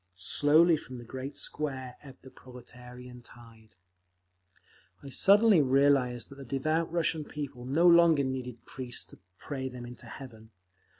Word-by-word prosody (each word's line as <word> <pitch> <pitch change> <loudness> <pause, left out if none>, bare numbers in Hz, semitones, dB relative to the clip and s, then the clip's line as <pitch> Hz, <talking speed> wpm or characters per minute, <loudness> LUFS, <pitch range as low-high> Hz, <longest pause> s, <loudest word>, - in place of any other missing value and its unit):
Slowly 155 - +3
from 130 -3 -10
the 120 - -9
great 130 +4 -8
Square 130 -4 -5
ebbed 135 -2 -15
the 130 - -13
proletarian 125 0 -13
tide…. 115 -3 -17 1.3
I 140 - -9
suddenly 200 - +4
realised 135 -2 +2
that 140 0 -13
the - - -8
devout 155 +6 -1
Russian 165 -2 0
people 140 -4 -7
no 150 +7 +1
longer 170 -4 +6
needed 125 -3 -5
priests 125 -2 -5
to - - -16 0.2
pray 130 - -5
them 125 -1 -9
into 120 0 -10
heaven. 110 -5 -11
130 Hz, 140 wpm, -29 LUFS, 125-150 Hz, 1.3 s, longer